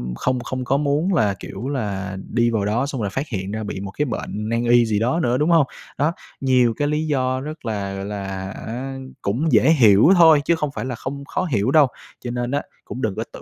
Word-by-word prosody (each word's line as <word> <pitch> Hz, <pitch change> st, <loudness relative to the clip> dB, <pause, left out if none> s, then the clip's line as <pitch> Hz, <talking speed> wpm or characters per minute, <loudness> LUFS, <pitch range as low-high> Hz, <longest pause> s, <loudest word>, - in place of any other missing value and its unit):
không 130 Hz, -, -1 dB
không 125 Hz, +1 st, -4 dB
có 135 Hz, +3 st, +2 dB
muốn 150 Hz, +6 st, +1 dB
là, 105 Hz, -7 st, +2 dB
kiểu 115 Hz, +7 st, -7 dB
là, 100 Hz, -7 st, -3 dB
đi 120 Hz, 0 st, +2 dB
vào 105 Hz, -3 st, 0 dB
đó 115 Hz, +6 st, +1 dB
xong 135 Hz, -5 st, -4 dB
là 100 Hz, -, -1 dB
phát 135 Hz, +9 st, -3 dB
hiện 95 Hz, -3 st, -4 dB
ra 110 Hz, 0 st, -3 dB
bị 100 Hz, -2 st, -5 dB
một 100 Hz, 0 st, -6 dB
cái 150 Hz, -, -1 dB
bệnh 110 Hz, -3 st, -4 dB
nan 115 Hz, +1 st, 0 dB
y 120 Hz, 0 st, +5 dB
gì 105 Hz, -2 st, 0 dB
đó 125 Hz, +9 st, +1 dB
nữa, 125 Hz, -3 st, +1 dB
đúng 155 Hz, +3 st, +2 dB
hông? 160 Hz, -5 st, +5 dB, 0.3 s
Đó, 150 Hz, +5 st, +1 dB, 0.3 s
nhiều 125 Hz, -3 st, +3 dB
cái 145 Hz, -, 0 dB
lý 155 Hz, +1 st, -1 dB
do 130 Hz, -2 st, 0 dB
rất 155 Hz, -2 st, -8 dB
là, 100 Hz, -3 st, -3 dB
gọi 95 Hz, 0 st, -5 dB
là 100 Hz, -1 st, -5 dB, 0.2 s
hả, 125 Hz, +7 st, -6 dB, 0.2 s
cũng 130 Hz, +11 st, 0 dB
dễ -, -, +5 dB
hiểu 115 Hz, -, +6 dB
thôi, 160 Hz, -4 st, +7 dB
chứ 170 Hz, -, +3 dB
không 150 Hz, -3 st, -2 dB
phải -, -, -3 dB
là 125 Hz, -2 st, -3 dB
không 140 Hz, +4 st, -6 dB
khó 185 Hz, -, -2 dB
hiểu 120 Hz, -, 0 dB
đâu. 150 Hz, -3 st, +6 dB, 0.3 s
Cho 120 Hz, -, -5 dB
nên 120 Hz, +1 st, -2 dB
á, 145 Hz, -, 0 dB, 0.2 s
cũng 130 Hz, -, -6 dB
đừng 105 Hz, -3 st, -1 dB
có -, -, -2 dB
tự -, -, -9 dB
125 Hz, 245 wpm, -21 LUFS, 110-145 Hz, 0.3 s, thôi